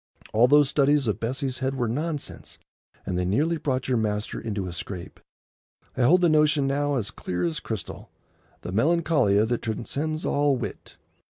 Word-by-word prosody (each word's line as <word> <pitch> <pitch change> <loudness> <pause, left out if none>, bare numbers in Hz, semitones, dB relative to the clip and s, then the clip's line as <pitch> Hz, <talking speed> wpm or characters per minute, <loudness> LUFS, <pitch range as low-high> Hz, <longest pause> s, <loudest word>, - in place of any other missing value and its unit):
All 115 +3 +5
those 145 +1 +5
studies 145 0 +2
of 110 - -1
Bessie's 130 +2 -2
head 135 +1 -1
were 125 -3 -1
nonsense, 150 +5 -4 0.5
and 90 -2 -2
they - - 0
nearly 150 - +1
brought 130 -4 -2
your 130 -2 +1
master 105 -1 -2
into 105 -4 -3
a 90 - -5
scrape. 90 0 -7 0.8
I - - -1
hold 175 +9 +5
the 175 - +5
notion 150 -2 +3
now 145 +1 0
as 110 -6 -2
clear 90 0 -4
as 85 -2 -1
crystal,—"the - - -9
Melancolia 140 - +3
that 120 0 -1
transcends 145 +8 -3
all 145 -1 +2
wit." - - -7
130 Hz, 165 wpm, -25 LUFS, 110-150 Hz, 0.8 s, All